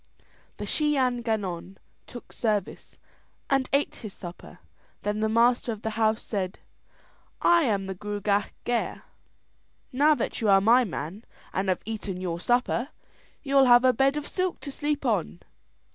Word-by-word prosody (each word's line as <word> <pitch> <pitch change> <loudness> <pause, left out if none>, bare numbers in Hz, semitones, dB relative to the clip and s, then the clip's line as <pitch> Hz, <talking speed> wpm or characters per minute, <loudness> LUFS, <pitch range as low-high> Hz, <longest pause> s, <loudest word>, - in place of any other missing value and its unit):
The - - -5
Shee 300 -2 +1
an 250 -2 +1
Gannon 195 -5 -3 0.3
took 240 - -11
service, 210 -4 -2 0.5
and 270 -1 +2
ate 280 +1 +1
his 215 -4 -8
supper. 175 -1 -10 0.5
Then 210 +1 -1
the 220 0 +1
master 235 +2 +3
of 215 -1 -7
the 220 - -2
house 220 0 +1
said: 190 -3 -3 0.8
"I 340 -2 +4
am 200 -5 0
the 190 - -4
Gruagach 205 +1 -1
Gaire; 240 -1 -2 0.9
now 295 +4 +4
that - - -3
you 220 - +2
are 195 -1 +7
my 235 +6 +5
man 180 +3 -6 0.3
and 190 +1 -1
have 185 - 0
eaten 205 -4 -4
your 175 -2 -3
supper, 245 +4 +1 0.5
you'll 275 -2 +4
have 245 0 +6
a 255 - +5
bed 270 +4 +2
of 295 - -4
silk 370 -1 -2
to 280 - -6
sleep 295 0 -2
on." 135 - -1
225 Hz, 160 wpm, -26 LUFS, 200-260 Hz, 0.9 s, are